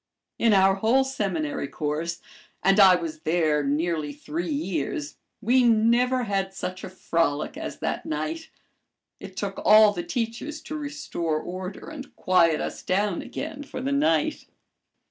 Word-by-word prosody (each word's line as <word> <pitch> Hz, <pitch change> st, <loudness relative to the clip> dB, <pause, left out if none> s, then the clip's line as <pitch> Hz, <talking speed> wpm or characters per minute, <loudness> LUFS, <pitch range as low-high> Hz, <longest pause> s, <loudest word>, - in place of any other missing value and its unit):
In 230 Hz, -, +4 dB
our 195 Hz, -1 st, +5 dB
whole 230 Hz, +7 st, +3 dB
seminary 185 Hz, -, -2 dB
course 155 Hz, +4 st, -3 dB, 0.4 s
and 195 Hz, +2 st, +4 dB
I 190 Hz, -2 st, +8 dB
was 165 Hz, -3 st, -4 dB
there 155 Hz, -2 st, +1 dB
nearly 150 Hz, +1 st, -1 dB
three 160 Hz, +4 st, -4 dB
years 150 Hz, -2 st, -3 dB, 0.2 s
we 250 Hz, +4 st, +4 dB
never 240 Hz, +2 st, +3 dB
had 195 Hz, -3 st, -2 dB
such 185 Hz, -1 st, -5 dB
a -, -, -5 dB
frolic 165 Hz, -, -1 dB
as 320 Hz, +2 st, -6 dB
that -, -, -2 dB
night. 320 Hz, 0 st, -3 dB, 0.7 s
It -, -, -11 dB
took -, -, -4 dB
all 215 Hz, 0 st, +7 dB
the -, -, -3 dB
teachers 280 Hz, -1 st, -4 dB
to 310 Hz, -1 st, -7 dB
restore 285 Hz, -, -3 dB
order 185 Hz, +3 st, -7 dB
and 280 Hz, -3 st, -9 dB
quiet 170 Hz, -4 st, +3 dB
us -, -, -4 dB
down 195 Hz, -1 st, 0 dB
again 295 Hz, -1 st, -6 dB
for 285 Hz, -, -7 dB
the 265 Hz, +2 st, -2 dB
night. 220 Hz, -, +1 dB
195 Hz, 145 wpm, -25 LUFS, 165-255 Hz, 0.7 s, I